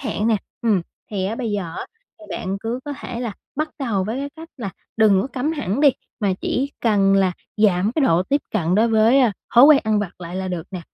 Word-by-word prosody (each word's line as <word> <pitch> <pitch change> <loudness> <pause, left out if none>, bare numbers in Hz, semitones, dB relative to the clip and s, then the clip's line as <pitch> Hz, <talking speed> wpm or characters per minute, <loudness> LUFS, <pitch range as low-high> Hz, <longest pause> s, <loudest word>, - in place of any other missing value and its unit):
hạn 225 -6 -2
nè. 225 -2 +3 0.3
Ừm, 210 -6 +2 0.3
thì 195 -3 -2
á 215 - -2
bây 235 -2 -3
giờ 190 -5 -3
á, - - -5 0.3
thì 320 - -12
bạn 190 +2 -3
cứ 235 +3 -3
có 290 - -4
thể 240 -3 -5
là 235 -4 -3 0.2
bắt 310 +1 0
đầu 215 -8 -1
với 220 +5 -3
cái 280 +1 -3
cách 325 +1 -10
là 210 -6 -4 0.3
đừng 210 -4 +5
có 225 - -2
cấm 275 +3 -2
hẳn 260 - -2
đi, 295 - +7 0.3
mà 200 -3 +2
chỉ 275 +2 -1
cần 200 -4 +3
là 190 -2 +3 0.2
giảm 205 0 +3
cái 310 - +1
độ 170 -2 +3
tiếp 280 +8 0
cận 180 -4 0
đối 225 +3 +4
với, 225 +4 +5
ơ, 245 -4 +4 0.2
thói 240 - +9
quen 290 -1 +8
ăn 215 -1 +2
vặt 200 -4 -3
lại 175 +1 -6
là 190 0 -3
được 175 -3 -4
nè. 185 -3 -5
215 Hz, 245 wpm, -21 LUFS, 190-255 Hz, 0.3 s, thói